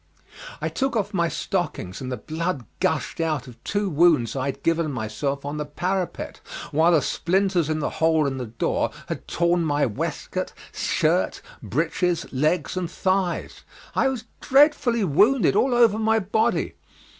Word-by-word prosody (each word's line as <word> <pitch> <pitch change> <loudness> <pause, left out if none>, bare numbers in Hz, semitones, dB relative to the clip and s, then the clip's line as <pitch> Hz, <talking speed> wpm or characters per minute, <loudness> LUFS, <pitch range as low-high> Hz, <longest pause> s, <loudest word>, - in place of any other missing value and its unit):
I - - -2
took 270 -2 -1
off 210 -1 -1
my 170 -3 +2
stockings, 150 - -3
and 130 -1 -4
the 125 - -2
blood 160 -5 -3
gushed - - -1
out 155 -5 -1
of 120 -2 -14
two 205 0 -1
wounds 155 - +3
I 130 0 -1
had 140 0 -4
given 165 -2 +1
myself 135 +4 -3
on 145 +1 -3
the 150 - -2
parapet, 180 +5 -3 0.3
while 165 +4 +4
the 155 -5 +4
splinters 185 -1 +1
in 155 - 0
the 150 - -1
hole 160 -1 +4
in 135 -1 -2
the 125 - -4
door 115 +2 -1 0.2
had - - -5
torn 170 0 +1
my 145 -2 +2
waistcoat, 110 -5 -3 0.2
shirt, - - 0 0.2
breeches, 170 +4 0
legs 155 +9 +1
and 180 -2 -2
thighs. 185 -1 -1 0.3
I - - +2
was 260 -4 -2 0.2
dreadfully 270 -5 +4
wounded 205 - +4
all 255 -2 +3
over 230 -3 +4
my 220 0 +3
body. 220 +3 0
170 Hz, 160 wpm, -24 LUFS, 145-195 Hz, 0.3 s, while